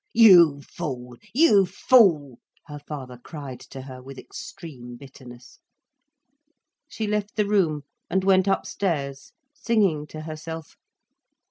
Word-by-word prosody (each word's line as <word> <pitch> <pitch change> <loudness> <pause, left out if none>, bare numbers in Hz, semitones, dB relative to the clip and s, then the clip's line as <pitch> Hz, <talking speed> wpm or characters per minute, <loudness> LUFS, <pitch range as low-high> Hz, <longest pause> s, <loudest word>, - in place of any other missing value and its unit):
"You 170 -10 +7
fool! 125 -8 -6 0.2
You 215 - +5
fool!" 170 - +3 0.3
her 150 -2 -9
father 135 -4 -8
cried 140 -3 -9
to 135 -1 -8
her, 130 -1 -10
with 135 +1 -11
extreme 130 -11 -10
bitterness. 125 -2 -14 1.3
She 220 - -4
left 210 0 -2
the 210 -1 +1
room, 175 -8 +1 0.3
and 190 +2 0
went 190 0 +3
upstairs, 155 -8 -2 0.2
singing 200 - 0
to 155 - -9
herself. 160 0 -8
155 Hz, 115 wpm, -24 LUFS, 135-195 Hz, 1.3 s, You